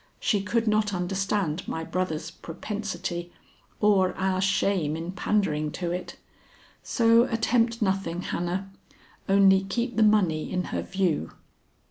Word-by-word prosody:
She 205 -3 +1
could 230 +3 0
not 210 -2 +2
understand 185 -2 -1
my 160 - -3
brother's 170 -2 -3
propensity 175 -1 -5 0.5
or 195 -3 +3
our 190 0 0
shame 190 -5 +1
in 165 +2 -5
pandering 175 -5 0
to 175 -2 -3
it. 180 +1 -5 0.7
So 230 0 +4
attempt 230 0 +1
nothing, 190 -3 -1
Hannah. 185 +3 -3 0.6
Only 195 -1 +6
keep 235 +5 -2
the - - +3
money 200 -8 +3
in 180 -1 0
her - - 0
view.'" 185 - -1
190 Hz, 125 wpm, -26 LUFS, 175-210 Hz, 0.7 s, Only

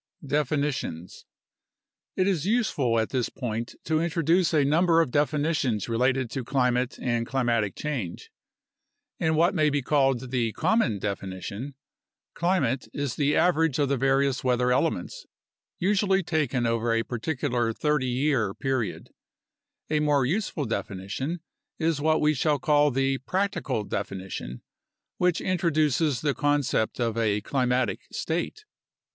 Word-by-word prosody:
Definitions 140 - -2 0.9
It 185 - +2
is 180 -4 0
useful 170 - +1
at 110 - -1
this 125 -3 0
point 115 -2 -4
to 155 0 +1
introduce 170 +1 +2
a 150 -4 +3
number 165 +3 +4
of 160 -7 +1
definitions 145 - 0
related 125 +1 +1
to 130 - -3
climate 125 0 0
and 120 -2 -1
climatic 120 -6 0
change. 125 - -4 0.9
In 160 -1 +1
what 170 +5 +3
may 155 -4 +3
be 145 -1 -1
called 135 -3 +1
the 120 -4 0
"common" 165 - +1
definition, 100 +6 -5 0.6
climate 165 -8 0
is 140 -3 -2
the 145 0 +1
average 165 -5 +3
of 145 -2 +1
the 140 - +1
various 135 +1 +1
weather 125 -1 +2
elements, 125 - -1 0.5
usually 195 0 +2
taken 150 -7 0
over 115 0 0
a 115 0 +1
particular 125 -2 -1
30 150 +2 0
year 125 -5 0
period. 130 -5 -2 0.8
A 155 - +3
more 145 -3 +2
useful 170 -1 -1
definition 110 - -4 0.4
is 160 -3 0
what 155 +1 +2
we 150 0 +3
shall 150 +1 +1
call 150 0 +3
the 135 0 0
"practical" 170 - -1
definition, 95 -11 -5 0.5
which 180 -2 +1
introduces 155 -5 +1
the 145 -2 +1
con 145 0 +1
cept 110 -2 -1
of 115 -1 0
a 105 -2 +1
climatic 125 -2 0
state. 175 - -3
135 Hz, 135 wpm, -26 LUFS, 120-155 Hz, 0.9 s, number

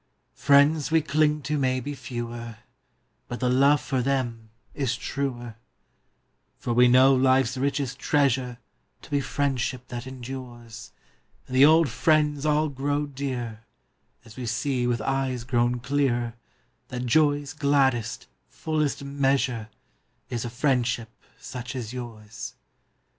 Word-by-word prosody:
Is - - -28
a - - -17
F - - -11
riends 145 +2 +5
xv)e 160 -1 +2
clinq 150 0 +2
to 150 +2 -1
mau 130 -1 +1
be 145 +4 -5
fe^Oer, 120 -3 -6 0.7
But 120 - -5
the 125 -1 +1
loOe 140 +3 +5
jor 130 -3 0
them 120 -4 -2 0.2
is 130 -4 -1
truer; 120 -4 -4 1.0
fbr 120 +1 +3
\Oe - - +5
know 130 +2 +6
life 130 0 +4
s 125 +3 -4
richest 135 -1 -1
treasure 130 -5 +1 0.5
To - - -14
be 145 -1 +2
friendship 130 -3 -2
that 120 +1 -6
em 130 -1 -9
dures, 120 - -8 0.6
And 130 - -6
the 135 +2 +8
old 160 +2 +6
jriends 150 -1 +1
all 150 0 +2
qroxO 145 +1 -2
dearer 125 -5 -4 0.3
& - - -40
As 115 - -13
vOe 125 0 -6
see 125 +2 -1
\oith 120 -2 0
eues 135 -3 -1
qro\On 120 0 +1
clearer 125 -3 0 0.5
That 125 0 -5
joq's 145 +2 +2
gladdest, 135 -6 +1 0.2
fullest 155 -3 -2
measure 135 -5 0 0.3
' - - -45
Is 120 -2 -2
a 120 - -4
friendship 120 -3 0 0.3
such 125 0 -7
as 120 -2 -5
Ljours. 115 -4 -7
130 Hz, 145 wpm, -26 LUFS, 120-140 Hz, 1.0 s, the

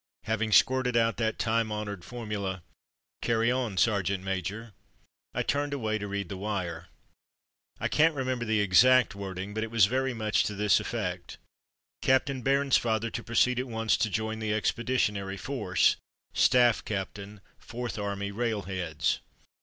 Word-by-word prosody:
Having 110 0 -1
squirted 125 -1 +4
out 115 0 +2
that 110 -1 -1
time 115 -1 0
honoured 105 -4 -4
formula, 100 -5 -5 0.6
"Carry 115 0 +2
on, 125 -6 -2
sergeant 100 -3 +1
major,'' 95 +4 -4 0.6
I - - 0
turned 145 0 -1
away 110 -4 -1
to 105 - -4
read 100 -1 -3
the 95 - -6
wire. 90 -4 -4 0.9
I - - 0
can't 160 +1 +3
re 135 - -2
member 130 -2 -2
the 110 -2 +1
ex 95 +2 +6
act 130 -4 +4
wording, 95 0 -6
but 110 +1 -2
it 115 - -4
was 115 -3 +5
very 130 +3 -1
much 110 -1 +1
to 105 - -3
this 105 0 +3
effect: - - -4 0.7
"C - - +3
a 130 - +6
p - - -23
t 140 - -3
ain 130 -2 -7
Bairnsfather 120 -5 +2
to - - -4
proceed 125 +2 +2
at 130 - -3
once 115 -2 +1
to 110 - 0
join 110 +1 -2
the 110 -1 -2
Ex 110 - +1
peditionary 105 -5 -1
Force, 90 - +1 0.4
Staff 120 -3 +4
Capt. 100 -1 -4 0.4
Fourth 120 -1 -6
Army 100 0 -3
Railheads." 95 -8 -1
110 Hz, 170 wpm, -28 LUFS, 100-120 Hz, 0.9 s, ex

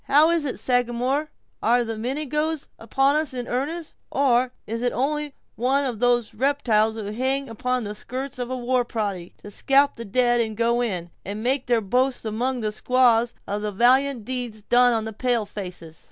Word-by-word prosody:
"How 305 +4 +5
is 335 -3 +1
it, 265 - -3
Sagamore? 250 +4 0 0.3
Are 240 +2 +3
the 225 -1 -4
Mingoes 300 +6 -2
upon 270 +5 +2
us 305 -4 -1
in 245 -1 -4
earnest, 305 +6 -3 0.2
or 255 -2 +2
is 230 +2 -4
it 245 0 +1
only 295 +2 -1 0.2
one 265 +5 +1
of 240 -5 -3
those 240 -2 +2
reptiles 225 -4 +2
who 210 -2 -5
hang 265 +4 -1
upon 250 +2 -2
the 205 0 -4
skirts 255 +5 -6
of 245 0 -3
a 255 - -2
war 250 0 +1
party, 200 -7 -4
to 205 - -8
scalp 275 +6 +3
the 230 - -5
dead, 235 0 +1
go 235 +1 +2
in, 180 -7 -3
and 205 +2 -5
make 260 +2 0
their 240 -2 +3
boast 250 +5 0
among 245 +4 -1
the 215 -1 -1
squaws 240 0 +3
of 205 +1 -3
the 210 0 -2
valiant 250 +3 +3
deeds 245 -4 -4
done 245 +2 +5
on 225 -2 0
the 220 - -5
pale 240 -1 0
faces?" 180 -5 -8
245 Hz, 185 wpm, -24 LUFS, 220-265 Hz, 0.3 s, How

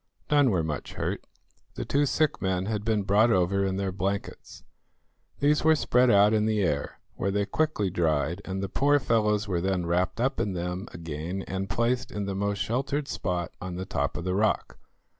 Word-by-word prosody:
None 145 -3 +5
were 90 -6 +1
much 75 -2 -4
hurt. - - -3 0.5
The - - -4
two 145 +1 +2
sick 155 +2 +1
men 95 -1 0
had 105 -1 -2
been 110 -2 +1
brought 105 +4 +4
over 95 -1 +2
in 95 -1 0
their 100 -1 -1
blankets. 100 +1 -4 0.8
These 150 +2 +3
were 160 0 +5
spread 125 -4 +3
out 105 0 +5
in 110 0 +2
the 105 -2 +1
air, 75 -5 -2
where 100 - -2
they 100 +1 0
quickly 125 -9 0
dried, 80 +1 0
and 95 0 -4
the - - -1
poor 145 +9 +3
fellows 105 -5 +1
were 90 -3 -1
then 95 -1 0
wrapped 90 +5 0
up 130 +3 0
in 100 - 0
them 90 +3 -4
again 85 +3 -5
and 95 0 -4
placed 120 +4 0
in 105 -1 -3
the 100 - -3
most 100 +1 -1
sheltered 140 +4 -1
spot 90 -1 -2
on 90 -1 -5
the 95 +1 -4
top - - -2
of 85 - -4
the 90 0 -1
rock. 105 +3 0
100 Hz, 195 wpm, -27 LUFS, 90-115 Hz, 0.8 s, None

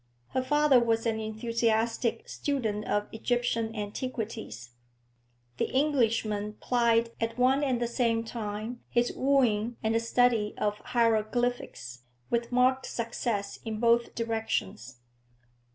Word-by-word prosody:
Her 260 - 0
father 290 0 +4
was 230 -1 +1
an 225 -1 0
enthusiastic 225 +1 0
student 225 -7 -2
of 205 0 0
Egyptian 230 -1 -1
antiquities; 210 - -5 0.9
the - - 0
Englishman 230 -7 +1
plied 230 0 +2
at 230 +1 -2
one 260 +3 +3
and 260 -4 +1
the 240 - 0
same 230 -1 +1
time 225 +1 -5
his 240 0 +1
wooing 240 -4 +2
and 220 0 +1
the 225 - +3
study 230 -2 +2
of 210 0 -1
hieroglyphics, 225 - 0 0.3
with 235 0 0
marked 255 +1 +3
success 230 -3 -3
in 220 -2 -4
both 235 0 +2
directions. 220 - -3
230 Hz, 120 wpm, -29 LUFS, 215-245 Hz, 0.9 s, father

